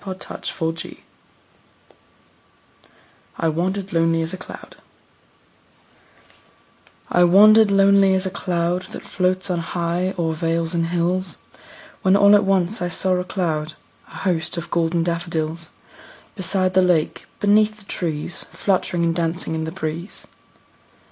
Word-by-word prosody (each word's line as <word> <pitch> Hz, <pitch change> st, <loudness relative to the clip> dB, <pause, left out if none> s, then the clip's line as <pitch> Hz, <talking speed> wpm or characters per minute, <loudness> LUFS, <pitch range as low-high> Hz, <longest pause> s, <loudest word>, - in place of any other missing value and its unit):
William 190 Hz, -1 st, -6 dB, 0.4 s
Wordsworth 165 Hz, 0 st, -3 dB, 2.4 s
I 165 Hz, -, +1 dB
Wandered 185 Hz, +4 st, -2 dB
Lonely 165 Hz, 0 st, +2 dB
As 165 Hz, +3 st, -5 dB
a -, -, -4 dB
Cloud -, -, -11 dB, 2.3 s
I 175 Hz, -, +4 dB
WANDERED 210 Hz, +4 st, +7 dB
lonely 195 Hz, -1 st, +5 dB
as 190 Hz, +1 st, 0 dB
a 190 Hz, -, -2 dB
cloud 175 Hz, 0 st, -2 dB
That -, -, -7 dB
floats 185 Hz, +1 st, -1 dB
on 175 Hz, -, 0 dB
high 175 Hz, +2 st, -2 dB
o'er 165 Hz, -2 st, 0 dB
vales 165 Hz, +1 st, -1 dB
and 165 Hz, -1 st, 0 dB
hills, 175 Hz, +2 st, 0 dB, 0.6 s
When 190 Hz, -2 st, +4 dB
all 200 Hz, 0 st, +6 dB
at 205 Hz, -1 st, +5 dB
once 195 Hz, +1 st, +1 dB
I 175 Hz, -, 0 dB
saw 185 Hz, +2 st, +1 dB
a 180 Hz, -, -1 dB
crowd, 160 Hz, -5 st, -2 dB, 0.3 s
A -, -, -15 dB
host, 165 Hz, -3 st, 0 dB
of 170 Hz, 0 st, -6 dB
golden 170 Hz, 0 st, +1 dB
daffodils; 170 Hz, -1 st, -3 dB, 0.7 s
Beside 185 Hz, -1 st, 0 dB
the 185 Hz, -, +5 dB
lake, 175 Hz, -4 st, +1 dB
beneath 210 Hz, +1 st, +3 dB
the 210 Hz, -, -18 dB
trees, 165 Hz, -2 st, -4 dB
Fluttering 180 Hz, -3 st, 0 dB
and 165 Hz, 0 st, +1 dB
dancing 165 Hz, -1 st, -2 dB
in 160 Hz, 0 st, -2 dB
the 160 Hz, -, -5 dB
breeze. 165 Hz, +1 st, -6 dB
175 Hz, 135 wpm, -21 LUFS, 165-190 Hz, 2.4 s, WANDERED